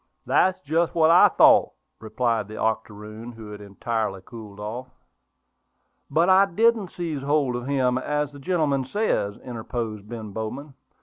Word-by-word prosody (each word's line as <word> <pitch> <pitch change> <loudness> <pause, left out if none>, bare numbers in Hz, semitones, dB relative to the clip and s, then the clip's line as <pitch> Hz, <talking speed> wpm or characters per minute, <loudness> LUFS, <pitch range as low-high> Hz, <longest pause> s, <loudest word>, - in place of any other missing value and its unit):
"That's 185 0 +2
just 165 +2 0
what 160 -1 +5
I 175 - +8
thought," - - +5 0.3
replied 110 -1 -1
the 110 - -9
octoroon, 110 +1 -4
who 110 -2 -10
had 105 0 -9
entirely 100 -1 -3
cooled 110 -4 -11
off. 115 +5 -6 1.2
"But 165 +5 +2
I 190 +1 +6
didn't 220 +2 +2
seize 165 -6 -4
hold 140 -3 +1
of 120 +1 -5
him, 130 -3 +1
as 150 +1 -2
the 145 - -12
gentleman 145 -3 0
says," 130 - -1
interposed 115 -3 -5
Ben 110 -3 -7
Bowman. 125 +8 -6
125 Hz, 145 wpm, -24 LUFS, 110-155 Hz, 1.2 s, I